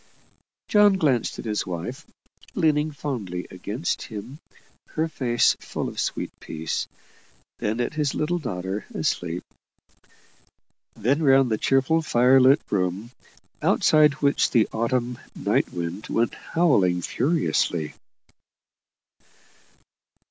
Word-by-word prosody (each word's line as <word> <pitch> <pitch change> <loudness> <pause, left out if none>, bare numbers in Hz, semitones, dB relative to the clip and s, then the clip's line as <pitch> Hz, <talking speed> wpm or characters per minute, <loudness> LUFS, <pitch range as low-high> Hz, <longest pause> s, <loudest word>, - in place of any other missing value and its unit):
John 205 -1 +5
glanced 145 - +1
at - - -7
his 105 -2 -1
wife, 90 - -6 0.5
leaning 155 -3 +2
fondly 110 -12 -4
against 105 - -3
him, 115 +7 -8 0.6
her 160 +1 +1
face 120 -6 +2
full - - -4
of - - -6
sweet - - -2
peace, 80 0 -4 0.7
then 110 +3 -1
at 120 - -1
his 150 -2 -1
little 175 +3 0
daughter 95 - -4
asleep, 85 0 -2 1.5
then 140 +8 +1
round 135 -4 +4
the 110 - 0
cheerful 135 +5 +2
fire 130 -2 +4
lit 135 +4 +6
room, 95 +4 -1 0.5
outside 150 -1 +4
which 140 0 +3
the 115 -4 +3
autumn 120 +2 -1 0.2
night - - 0
wind 85 +4 -5
went 115 +1 0
howling 95 - +1
furiously. 115 - 0
120 Hz, 110 wpm, -24 LUFS, 100-150 Hz, 1.5 s, lit